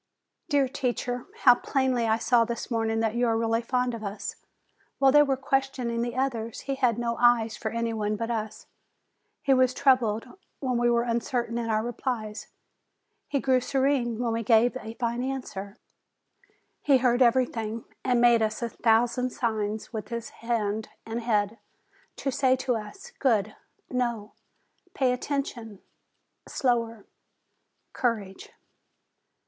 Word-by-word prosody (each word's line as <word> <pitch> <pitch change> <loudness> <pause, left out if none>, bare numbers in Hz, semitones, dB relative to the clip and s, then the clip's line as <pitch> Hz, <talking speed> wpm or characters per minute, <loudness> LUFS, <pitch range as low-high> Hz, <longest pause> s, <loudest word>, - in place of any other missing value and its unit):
Dear 285 -3 +3
teacher! 250 -2 -3 0.2
how 245 - +9
plainly 255 -2 0
I 220 0 +3
saw 235 +1 +3
this 235 +2 -5
morning 225 -1 0
that 220 -1 0
you 240 +1 +1
are 225 -1 +2
really 225 0 +1
fond 250 +1 0
of 225 -2 -6
us! 200 0 -5 0.6
While 270 -1 +5
they 295 +2 +7
were 275 -2 +2
question 270 -2 -1
ing 235 0 -1
the 240 0 -3
others, 235 -4 -2
he 275 - -3
had 250 -4 +1
no 235 -1 -1
eyes 235 -2 +4
for 220 - -4
any 230 0 -2
one 215 -1 -1
but 230 +2 -3
us. 220 -2 -4 0.8
He 275 - +4
was 255 -1 +3
troubled 240 -6 +3 0.3
when 255 -3 -1
we 240 0 +3
were 235 0 +3
uncertain 235 0 -1
in 230 -1 -3
our 215 0 +1
replies; 230 -3 -4 0.8
he 280 - 0
grew 260 -1 +2
serene 260 -3 +1
when 235 -1 -1
we 230 - -1
gave 230 +2 +4
a 225 -3 -8
fine 235 0 -2
answer; 250 -7 -5 1.0
he 280 -2 +5
heard 250 0 +2
everything, 230 -3 +1 0.2
and 245 -2 +2
made 235 -1 +5
us 220 +2 -1
a 235 - -1
thousand 240 +3 +2
signs 220 -2 -3
with 215 -2 -4
his 235 -1 -5
hand 220 -2 -2 0.2
and 225 +1 -4
head, 215 -1 0 0.6
to 275 - -2
say 260 0 +3
to 255 -1 -1
us, 225 - -8
"Good! 215 -5 +1 0.4
no! 235 -4 -2 0.6
pay 260 -5 +2
attention! 250 -5 -4 0.7
slower! 230 -4 -1 0.9
courage 210 -6 -2
235 Hz, 150 wpm, -27 LUFS, 225-255 Hz, 1.0 s, how